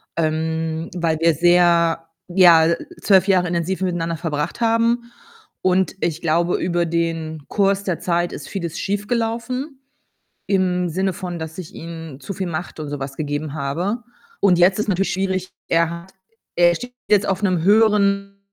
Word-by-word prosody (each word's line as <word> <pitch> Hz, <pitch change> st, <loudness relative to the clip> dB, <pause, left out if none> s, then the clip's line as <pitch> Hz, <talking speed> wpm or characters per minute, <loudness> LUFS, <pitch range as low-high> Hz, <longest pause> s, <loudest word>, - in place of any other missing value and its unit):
ähm, 160 Hz, 0 st, -1 dB
weil 165 Hz, -3 st, 0 dB
wir 165 Hz, 0 st, +4 dB
sehr 170 Hz, 0 st, +3 dB, 0.2 s
ja, 175 Hz, -3 st, +6 dB
äh, 170 Hz, 0 st, -1 dB, 0.2 s
12 190 Hz, -2 st, +4 dB
Jahre 185 Hz, -2 st, +3 dB
intensiv 175 Hz, +2 st, -2 dB
miteinander 170 Hz, -3 st, -1 dB
verbracht 160 Hz, +4 st, -3 dB
haben 230 Hz, +1 st, +1 dB, 0.5 s
und 185 Hz, 0 st, +2 dB
ich 165 Hz, -1 st, -1 dB
glaube, 170 Hz, +2 st, +1 dB
über 175 Hz, -1 st, 0 dB
den 165 Hz, -2 st, -2 dB
Kurs 200 Hz, -1 st, +1 dB
der 185 Hz, -4 st, -2 dB
Zeit 175 Hz, 0 st, 0 dB
ist 140 Hz, -, -8 dB
vieles 170 Hz, -4 st, -4 dB
schiefgelaufen. 230 Hz, +6 st, -2 dB, 0.7 s
Im 180 Hz, -2 st, +1 dB
Sinne 190 Hz, +3 st, 0 dB
von, 175 Hz, -1 st, -5 dB
dass 160 Hz, +1 st, -7 dB
ich 180 Hz, -4 st, -8 dB
ihm 165 Hz, -4 st, -8 dB
zu 195 Hz, -, -6 dB
viel 190 Hz, -, -3 dB
Macht 170 Hz, 0 st, -5 dB
und 150 Hz, -, -5 dB
so 145 Hz, -, -4 dB
was 135 Hz, 0 st, -6 dB
gegeben 145 Hz, 0 st, -3 dB
habe 170 Hz, -, -2 dB, 0.4 s
und 185 Hz, -3 st, +4 dB
jetzt 185 Hz, +3 st, +4 dB
ist 210 Hz, -, -1 dB
natürlich 195 Hz, 0 st, +1 dB
schwierig. 190 Hz, -1 st, -2 dB, 0.2 s
Er 165 Hz, 0 st, +2 dB
hat 170 Hz, +2 st, -9 dB, 0.4 s
er 175 Hz, 0 st, +5 dB
steht 245 Hz, +4 st, -8 dB
jetzt 205 Hz, -2 st, +4 dB
auf 190 Hz, +1 st, -1 dB
'nem 185 Hz, -5 st, +1 dB
höheren, 200 Hz, -1 st, +3 dB
175 Hz, 160 wpm, -21 LUFS, 165-195 Hz, 0.7 s, ja